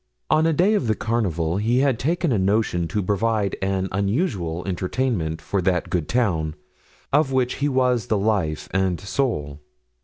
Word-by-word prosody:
On 155 Hz, +1 st, +4 dB
a -, -, +3 dB
day 180 Hz, +7 st, +3 dB
of 205 Hz, -, +1 dB
the 110 Hz, -, +2 dB
carnival 95 Hz, -8 st, -1 dB
he 115 Hz, +4 st, +1 dB
had 135 Hz, -4 st, +2 dB
taken 170 Hz, +2 st, 0 dB
a 110 Hz, -, +2 dB
notion 95 Hz, -3 st, +1 dB
to 100 Hz, +5 st, -2 dB
provide 105 Hz, +1 st, 0 dB
an 95 Hz, 0 st, 0 dB
unusual 100 Hz, -, -1 dB
entertainment 90 Hz, -3 st, -1 dB
for 100 Hz, +2 st, -1 dB
that 90 Hz, -1 st, 0 dB
good 85 Hz, -5 st, -1 dB
town, 85 Hz, -11 st, 0 dB, 0.6 s
of 145 Hz, -1 st, +3 dB
which 130 Hz, -1 st, 0 dB
he 145 Hz, +1 st, 0 dB
was 125 Hz, -4 st, +1 dB
the 110 Hz, -, +1 dB
life 95 Hz, -7 st, 0 dB
and 95 Hz, -2 st, +1 dB
soul. 95 Hz, -, -2 dB
105 Hz, 165 wpm, -23 LUFS, 90-125 Hz, 0.6 s, On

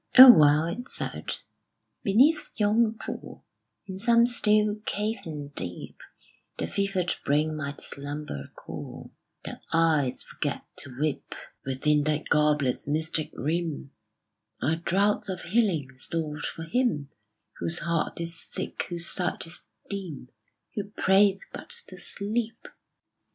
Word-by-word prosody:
"O 260 Hz, 0 st, +14 dB
well," 150 Hz, -1 st, +5 dB
it 235 Hz, +10 st, -4 dB
said, -, -, -3 dB, 0.7 s
"beneath 265 Hz, +11 st, +4 dB
yon 220 Hz, +1 st, +3 dB
pool, -, -, -7 dB, 0.4 s
In 190 Hz, -1 st, -7 dB
some 235 Hz, +2 st, +5 dB
still 215 Hz, -3 st, +3 dB
cavern 170 Hz, -11 st, -3 dB
deep, 90 Hz, -10 st, -6 dB, 0.6 s
The -, -, -1 dB
fevered 195 Hz, -3 st, 0 dB
brain 150 Hz, +2 st, +1 dB
might 140 Hz, -2 st, -4 dB
slumber 145 Hz, -, -6 dB
cool, -, -, -8 dB, 0.3 s
The -, -, -6 dB
eyes 160 Hz, -5 st, +2 dB
forget -, -, -3 dB
to 130 Hz, 0 st, -8 dB
weep: 150 Hz, -1 st, -2 dB, 0.3 s
Within 145 Hz, +3 st, +2 dB
that 155 Hz, 0 st, 0 dB
goblet's 150 Hz, -4 st, +2 dB
mystic 155 Hz, +1 st, 0 dB
rim 160 Hz, -2 st, -2 dB, 0.7 s
Are 160 Hz, +4 st, +1 dB
draughts 195 Hz, +5 st, +1 dB
of 185 Hz, -1 st, -4 dB
healing, 180 Hz, -, +1 dB
stored 155 Hz, 0 st, -3 dB
for 165 Hz, -, -6 dB
him 165 Hz, -, 0 dB, 0.5 s
Whose 170 Hz, +1 st, -1 dB
heart 170 Hz, 0 st, -1 dB
is 170 Hz, 0 st, -2 dB
sick, -, -, -4 dB
whose 170 Hz, -1 st, -1 dB
sight 180 Hz, 0 st, -1 dB
is 165 Hz, -, -9 dB, 0.3 s
dim, 180 Hz, -10 st, -5 dB, 0.4 s
Who 205 Hz, -, -3 dB
prayeth 195 Hz, -1 st, +3 dB
but -, -, -8 dB, 0.2 s
to -, -, -10 dB
sleep!" 225 Hz, +3 st, -3 dB
165 Hz, 125 wpm, -27 LUFS, 150-205 Hz, 0.7 s, O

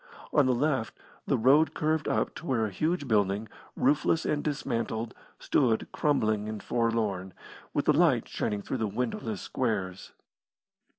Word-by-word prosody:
On 145 Hz, -3 st, +5 dB
the 130 Hz, -, +3 dB
left 130 Hz, -3 st, 0 dB, 0.3 s
the -, -, +2 dB
road 140 Hz, +7 st, +4 dB
curved 155 Hz, 0 st, 0 dB
up -, -, 0 dB
to 170 Hz, -, -9 dB
where 115 Hz, -6 st, +1 dB
a 105 Hz, -, -4 dB
huge 155 Hz, -, -1 dB
building, 105 Hz, -1 st, +1 dB, 0.3 s
roofless 150 Hz, +4 st, +2 dB
and 150 Hz, -1 st, 0 dB
dismantled, 115 Hz, -6 st, -2 dB, 0.2 s
stood 115 Hz, -5 st, +1 dB
crumbling 110 Hz, -8 st, +1 dB
and 110 Hz, -1 st, -6 dB
forlorn, 110 Hz, -6 st, -1 dB, 0.4 s
with 145 Hz, -, -1 dB
the 150 Hz, -, +5 dB
light 150 Hz, -7 st, +3 dB
shining 105 Hz, -2 st, -2 dB
through -, -, -3 dB
the 110 Hz, -2 st, 0 dB
windowless 115 Hz, -1 st, -3 dB
squares. 95 Hz, -7 st, -2 dB
115 Hz, 145 wpm, -29 LUFS, 110-145 Hz, 0.4 s, On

